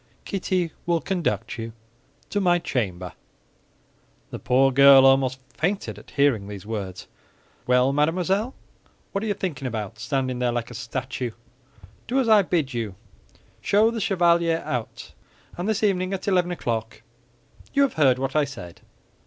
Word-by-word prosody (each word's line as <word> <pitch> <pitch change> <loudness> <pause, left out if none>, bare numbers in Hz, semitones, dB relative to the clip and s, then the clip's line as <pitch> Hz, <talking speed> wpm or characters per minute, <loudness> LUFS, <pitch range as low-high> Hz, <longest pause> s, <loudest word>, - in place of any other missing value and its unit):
Kitty 185 -3 -1 0.2
will 170 -1 +2
conduct 120 - -2
you 115 0 -6 0.6
to 205 - 0
my 175 -2 +4
chamber." 95 - -3 1.2
The - - -6
poor 135 +2 +3
girl 135 0 +8
almost 135 -1 +3
fainted 185 +8 -2
at - - -17
hearing 135 -8 +1
these 100 -2 -8
words. 100 -4 -5 0.6
"Well, 125 +2 +3
mademoiselle, 185 - 0 0.6
what 195 - -2
are - - -2
you 205 - 0
thinking 155 -9 -4
about, 110 -2 -5
standing 130 +2 -2
there 125 -1 +1
like 120 -1 -3
a - - -8
statue? 125 0 -4 0.7
Do 255 - 0
as 255 - +1
I 215 -2 +7
bid 165 -8 -1
you: 110 -5 -3 0.7
show 215 +3 +3
the 230 -1 -4
chevalier 170 -4 +2
out; 120 -3 -5 0.4
and 180 +5 -3
this 220 0 0
evening 190 -2 +1
at 190 - -8
eleven 180 -3 +2
o'clock—you 120 - -4
have 275 - +1
heard 135 -5 +4
what 135 +1 -3
I 150 - +4
said." 110 -12 -8
140 Hz, 150 wpm, -24 LUFS, 120-185 Hz, 1.2 s, girl